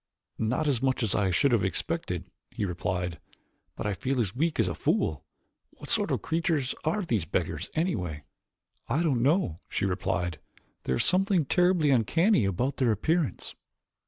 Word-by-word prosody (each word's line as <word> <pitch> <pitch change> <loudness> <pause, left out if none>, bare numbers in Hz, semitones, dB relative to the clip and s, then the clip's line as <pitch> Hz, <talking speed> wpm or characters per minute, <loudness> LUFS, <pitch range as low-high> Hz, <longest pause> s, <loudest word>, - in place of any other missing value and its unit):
"Not 125 +8 0
as 130 -5 +1
much 130 -2 +1
as 105 - +2
I 100 -2 +2
should 130 +9 +3
have 115 -4 +3
expected," - - -2 0.3
he 105 - -3
replied, 90 -1 -2 0.6
"but - - -5
I 105 - 0
feel 130 +6 -1
as 110 -2 -1
weak 160 +2 0
as 110 - +3
a 85 - -1
fool. 80 -1 0 0.5
What - - -12
sort - - +2
of - - -1
creatures 160 -5 0
are 170 +7 0
these 115 - 0
beggars, 85 0 -2
anyway?" 90 - -1 0.6
"I 160 +5 +1
don't 135 -8 +1
know," 135 - +2
she - - -1
replied, 90 -3 -1 0.5
"there 65 - +1
is - - +2
something 185 -3 +3
terribly 175 -1 +3
uncanny 140 - +3
about 125 +9 -1
their 125 -4 +3
appearance." 160 - 0
125 Hz, 165 wpm, -28 LUFS, -, 0.6 s, should